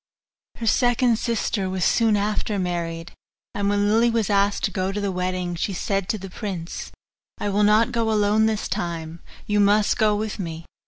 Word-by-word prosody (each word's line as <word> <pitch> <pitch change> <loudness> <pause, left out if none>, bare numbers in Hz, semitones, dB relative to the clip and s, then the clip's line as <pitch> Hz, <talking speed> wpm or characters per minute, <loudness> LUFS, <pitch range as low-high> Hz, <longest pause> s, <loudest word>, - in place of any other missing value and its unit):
Her 230 - -6
second 245 0 +3
sister 220 -4 -1
was 185 -1 -1
soon 225 -3 +3
after 210 0 -1
married, 170 -2 -3 0.4
and 200 0 0
when 205 0 +2
Lily 225 +3 +4
was 225 -3 0
asked 200 0 +2
to - - +1
go 190 -1 -1
to 205 - -3
the 200 -1 -1
wedding, 180 -1 -2
she 175 +4 -2
said 195 +1 -2
to 215 - 0
the 195 -1 -8
prince, 185 -5 -6 0.5
'I 205 - -2
will 205 +1 +2
not 215 +4 +4
go 230 -2 0
alone 215 +1 +3
this 220 -2 -1
time 170 -4 -4 0.3
you 210 0 +1
must 205 +2 +3
go 215 -2 +3
with 215 0 -3
me. 165 -3 -5
205 Hz, 190 wpm, -23 LUFS, 185-215 Hz, 0.5 s, Lily